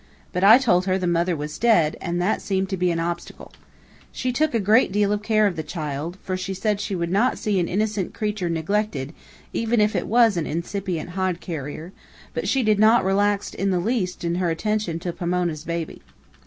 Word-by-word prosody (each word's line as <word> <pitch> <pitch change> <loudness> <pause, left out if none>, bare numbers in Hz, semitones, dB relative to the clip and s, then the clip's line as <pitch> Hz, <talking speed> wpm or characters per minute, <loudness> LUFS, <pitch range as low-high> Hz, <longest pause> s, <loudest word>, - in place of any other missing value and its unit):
But 180 0 -1
I 215 +4 +9
told 195 -8 +2
her 185 0 +2
the 185 - -2
mother 175 0 +1
was 150 0 -6
dead, 175 -10 +3
and 175 -1 -2
that 185 +5 0
seemed 190 -1 -1
to 195 - -1
be 180 -1 +1
an 170 -1 0
obstacle. 170 +1 -5 0.6
She 255 - -2
took 305 +1 0
a - - +3
good 215 +2 +4
deal 205 0 +2
of 210 0 0
care 215 0 +2
of 195 -4 +1
the 160 - -3
child, 155 +1 -5
for 185 - -2
she 190 +1 -4
said 205 +1 -1
she 205 -1 -3
would 170 -1 -2
not 225 +7 +2
see 205 -3 0
an 170 - 0
innocent 210 -1 -1
creature 210 -5 -2
neglected, 165 -3 -1 0.4
even 230 0 +1
if 210 0 +2
it - - -1
was 225 -3 +4
an 165 - -1
incipient 175 +1 -3
hod 185 -1 -1
carrier, 160 +1 -6 0.4
but - - -3
she 265 -2 +2
did 215 -2 +2
not 220 -1 +5
relax 200 +1 +1
in 195 - -1
the 185 -2 +1
least 185 -3 -2
in 170 0 0
her 175 - +1
attention 210 0 -1
to 175 0 -4
Pomona's 175 -3 -2
baby. 170 -1 -4
185 Hz, 210 wpm, -23 LUFS, 170-210 Hz, 0.6 s, I